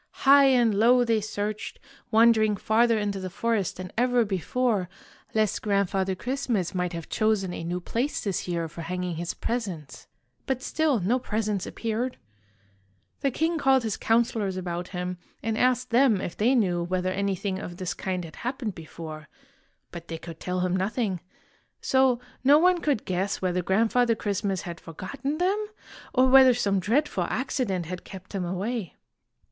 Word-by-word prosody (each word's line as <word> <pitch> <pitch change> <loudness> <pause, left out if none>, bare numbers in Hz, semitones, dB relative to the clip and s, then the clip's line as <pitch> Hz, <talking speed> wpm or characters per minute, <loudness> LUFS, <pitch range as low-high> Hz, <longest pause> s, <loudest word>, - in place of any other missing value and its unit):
High 280 +1 +8
and 245 -5 +4
low 240 +5 +5
they 225 -2 +2
searched, 210 0 -4 0.3
wandering 220 -2 +4
farther 230 +3 +3
into 205 -2 -1
the 185 0 -5
forest 215 0 -1
than 185 -1 -7
ever 245 0 +3
before, 200 0 0 0.5
lest 215 -2 +1
Grand 200 -3 +1
father 190 -1 0
Christmas 240 -5 -2
might 180 -1 -1
have 165 -2 -6
chosen 215 -4 0
a - - -5
new 175 +2 -2
place 240 - -2
this 195 -3 -2
year 170 -2 -1
for 165 +2 -9
hanging 180 0 -3
his 170 +1 -3
presents; 175 - -4 0.4
but 265 -1 -1
still 310 -6 +1
no 230 +8 +2
presents 215 -4 -2
appeared. 230 +3 -3 1.0
The 275 - +1
king 320 +5 0
called 270 -3 +4
his 220 -3 -1
counselors 225 -4 +1
about 175 -1 -4
him, 180 -1 -4 0.2
and 225 0 -1
asked 250 +1 +1
them 240 -4 +4
if 180 - -5
they 240 +5 +3
knew 180 -7 +2
whether 185 +1 -1
anything 195 0 -1
of 175 -2 -7
this 185 -2 -3
kind 185 -2 -3
had 155 - -12
happened 245 -3 -3
before, 155 -2 -9 0.6
but 170 -1 -9
they 165 - -5
could 165 0 -10
tell 180 0 -2
him 180 0 +1
nothing. 195 0 -1 0.6
So 260 -2 +3 0.2
no 280 +3 +7
one 360 +2 +4
could 285 -9 0
guess 185 +2 -1
whether 180 -1 0
Grandfather 230 +6 +2
Christmas 200 -2 -2
had 170 -3 -7
forgotten 270 - -5
them, 395 +5 0 0.4
or 255 0 +4
whether 260 -1 +7
some 200 -5 +1
dreadful 220 - +1
accident 240 -9 -1
had 180 +2 -6
kept 190 0 -11
him 195 -2 -2
away. 190 +3 -3
205 Hz, 165 wpm, -26 LUFS, 180-245 Hz, 1.0 s, High